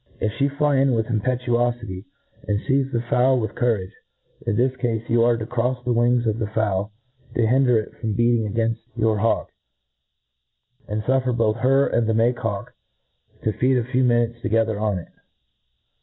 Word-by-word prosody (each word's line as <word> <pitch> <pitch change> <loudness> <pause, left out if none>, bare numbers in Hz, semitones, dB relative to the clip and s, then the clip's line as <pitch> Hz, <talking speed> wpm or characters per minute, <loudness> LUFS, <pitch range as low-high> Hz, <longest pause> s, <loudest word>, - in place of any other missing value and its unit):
If 110 - 0
{he 140 +1 +3
fly 145 0 +1
in 135 -1 +3
with 110 -1 0
impetuofity, 120 -3 -1 0.4
and 105 -1 +1
feize 135 -1 0
the 120 -2 -1
fowl 130 +2 +3
with 110 -2 -3
cou^ 120 -2 +2
rage, 95 -1 -8 0.5
in 115 - +1
this 125 +3 +1
cafe, 115 -4 -1
you 115 0 +3
are 120 0 +3
to 110 - -4
crofs 120 +2 -2
the 125 - +1
wings 120 +1 +2
of 110 0 0
the 110 - -1
fowl 105 -2 -1 0.4
to 115 - +2
hinder 125 0 +3
it 110 - -3
from 110 -3 -2
beatitig 115 -2 +2
againfl 115 0 0 0.2
your 110 -2 +1
hawk, 115 +2 0 1.4
and 105 +1 -3
fuflfer 130 0 +1
both 110 -1 +1
her 135 +4 +3
and 115 -1 0
the 110 - +1
make 120 +2 +2
hawk 105 -5 -4 0.7
to 110 - 0
feed 130 +3 +2
a 120 - +1
few 130 +2 0
minutes 120 -1 +1
together 110 -1 0
on 105 -3 0
it. 85 - -8
115 Hz, 185 wpm, -22 LUFS, 110-125 Hz, 1.4 s, he